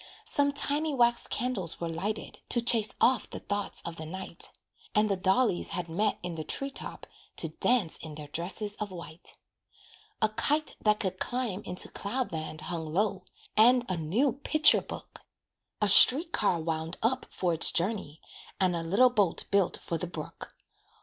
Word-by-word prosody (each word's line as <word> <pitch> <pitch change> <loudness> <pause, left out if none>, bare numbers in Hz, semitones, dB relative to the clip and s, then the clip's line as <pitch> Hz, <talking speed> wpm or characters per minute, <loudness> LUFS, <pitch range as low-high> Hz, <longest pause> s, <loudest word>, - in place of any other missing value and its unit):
Some 285 0 +2
tiny 290 +1 0
wax 240 -2 +3
candles 220 -9 -1
were 170 - -3
lighted, 190 +7 -5
To 240 - +2
chase 230 -2 +5
off 255 +1 +2
the - - -5
thoughts 205 0 -2
of 170 0 -7
the 160 - -6
night; 185 0 -7 0.5
And 210 0 +3
the - - +2
dollies 190 +2 +1
had 180 -2 -3
met 200 +7 -1
in 175 -1 -5
the 160 -1 -5
tree 275 - -3
top - - -7 0.3
To - - -3
dance 235 -10 +2
in 155 -2 -9
their 150 0 -8
dresses 190 +6 -1
of 210 - -4
white. 170 -2 -9 0.8
A 220 - +2
kite 295 +8 0
that 210 -1 +2
could 185 -2 -2
climb 245 -6 -3
into 180 +1 +5
cloud 250 +6 -4
land 155 -1 -6
Hung 160 -1 -4
low, 195 +1 -1 0.3
and 245 +3 +5
a 185 - 0
new 190 - 0
picture 300 +2 +4
book; - - -10 0.6
A - - +3
street 285 - +7
car 185 -5 +1
"wound 160 +1 -4
up" 255 +3 0
for 180 -2 -2
its 165 - +3
journey, 175 -5 -2 0.4
And 185 -2 +1
a 170 - -2
little 200 +10 +3
boat 205 -8 +1
built 200 -3 +2
for 165 - -3
the 180 - -4
brook. 160 -3 -9
195 Hz, 175 wpm, -28 LUFS, 170-240 Hz, 0.8 s, street